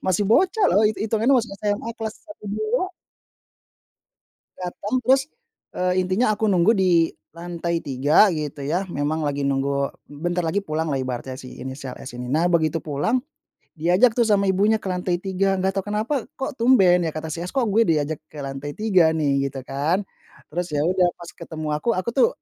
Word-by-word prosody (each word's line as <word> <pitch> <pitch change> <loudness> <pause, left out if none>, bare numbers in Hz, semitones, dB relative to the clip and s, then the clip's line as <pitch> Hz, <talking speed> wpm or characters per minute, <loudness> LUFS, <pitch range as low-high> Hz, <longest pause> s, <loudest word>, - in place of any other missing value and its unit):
Masih 190 +2 +2
bocah 380 - +3
loh 210 - +4
it 215 - -3
hitungannya 225 +5 +2
masih 225 -4 -3
SMA 210 +2 -1
kelas 220 -1 -4
1, 310 -9 -13
2. 215 - 0 1.8
Datang 200 +6 -4
terus, 265 +1 +5 0.5
eee, 180 0 +1
intinya 215 +4 +2
aku 220 - -1
nunggu 180 +4 +4
di 175 -4 +3 0.2
lantai 170 0 -3
3 145 +9 +4
gitu 150 -2 -4
ya, 175 +6 0
memang 150 +2 -1
lagi 140 -1 -1
nunggu 140 0 0 0.2
bentar 175 +4 -2
lagi 165 +5 0
pulanglah 155 -5 -2
ibaratnya 130 0 -4
si 130 - -10
inisial 130 0 -6
S - - -9
ini. 125 0 -7
Nah 165 +6 +1
begitu 160 -1 +1
pulang, 155 - 0 0.5
diajak 180 +9 +3
tuh 235 -2 +3
sama 200 -2 +3
ibunya 205 +4 +3
ke - - -4
lantai 180 -1 -1
3, 195 +1 0
nggak 190 +1 0
tahu 190 - -6
kenapa 220 +6 -1
kok 270 +2 -3
tumben? 185 -9 +5
Ya - - -2
kata 155 0 -4
si 165 - -4
S, 175 +1 -5
"Kok 260 - +3
gue 225 +2 +3
diajak 155 -1 0
ke 145 -2 -8
lantai 135 +2 -6
3 185 -7 +3
nih?" 140 -3 +1
Gitu 135 -1 -7
kan. 150 +9 -1 0.5
Terus 175 +2 -2
ya 145 - +1
udah 180 +1 +3
pas 170 -1 -10
ketemu 155 -1 -7
aku, 235 - -2
aku 185 +5 -2
tuh 270 - +4
175 Hz, 180 wpm, -23 LUFS, 150-210 Hz, 1.8 s, terus